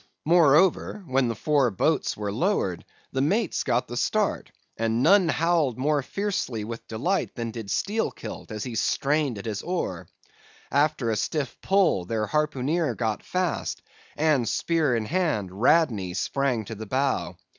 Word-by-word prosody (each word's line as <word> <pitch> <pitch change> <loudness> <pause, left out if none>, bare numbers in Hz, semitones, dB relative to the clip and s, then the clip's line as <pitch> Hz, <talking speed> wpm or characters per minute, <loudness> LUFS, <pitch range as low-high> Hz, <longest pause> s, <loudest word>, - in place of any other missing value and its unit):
Moreover, 170 +5 +4
when 130 -3 +1
the 115 - -2
four 140 +2 +2
boats 95 - 0
were 105 -1 -3
lowered, 110 - 0 0.3
the 135 - -1
mate's 195 +7 +1
got - - 0
the - - -6
start; - - 0 0.2
and 115 +2 0
none 185 +2 +5
howled 160 -6 +1
more 145 +2 +1
fiercely 185 - -2
with 115 +2 -7
delight 145 - -1
than 115 -2 -3
did 110 -3 -7
Steelkilt, 205 - -3
as 105 -1 -4
he 125 - -5
strained 140 +2 0
at 100 - -8
his 105 -2 -3
oar. 95 - -3 0.6
After 140 -4 +2
a - - 0
stiff 140 +3 -2
pull, 190 - +2
their 110 +2 -1
harpooneer 150 +3 0
got 110 -3 -2
fast, 180 -3 -2 0.3
and, 145 -7 +2
spear 160 -7 +1
in 110 -2 -1
hand, 145 - 0
Radney 115 - +3
sprang 125 +1 0
to 115 - -6
the 110 0 -8
bow. 125 -9 -1
135 Hz, 155 wpm, -26 LUFS, 110-165 Hz, 0.6 s, none